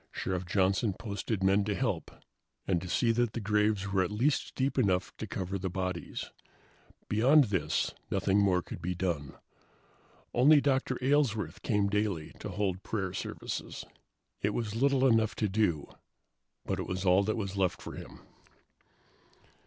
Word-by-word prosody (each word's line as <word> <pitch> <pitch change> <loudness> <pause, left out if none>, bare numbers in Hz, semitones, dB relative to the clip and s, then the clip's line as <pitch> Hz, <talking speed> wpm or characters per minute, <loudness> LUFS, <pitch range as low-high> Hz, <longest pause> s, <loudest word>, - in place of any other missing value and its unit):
Sheriff 90 -1 -3
Johnson 95 +2 +2
posted 105 -2 -3
men 100 +1 +4
to 105 -1 -1
help, - - -1 0.6
and 90 -3 +1
to 90 - -7
see 115 +5 +2
that 115 -1 0
graves 105 -1 +1
were 95 -1 +3
at 95 - 0
least 120 +8 0
deep 135 +1 0
enough 95 -6 +1
to - - -5
cover 95 +1 -3
the 95 +1 -2
bodies. 90 -1 -4 0.8
Beyond 130 +8 +5
this, 100 - 0 0.2
nothing 95 +2 +2
more 95 -3 +3
could - - -8
be 90 +2 -2
done. 85 -6 -2 1.0
Only 145 +5 +6
Dr. 130 -2 +1
Aylesworth 115 - +1
came 105 -2 +1
daily 100 -6 -1
to - - -6
hold 95 -3 -1
prayer 95 -4 -3
services. - - -5 0.6
It - - 0
was 110 -3 -2
little 135 +2 +3
enough 115 -4 +3
to 105 - 0
do, 95 -7 0 0.8
but - - -2
it - - -3
was 90 +1 -3
all 90 +1 +5
there 110 +2 0
was 100 -4 -3
left 95 -3 +1
for - - -8
him. - - -10
100 Hz, 155 wpm, -30 LUFS, 95-115 Hz, 1.0 s, Only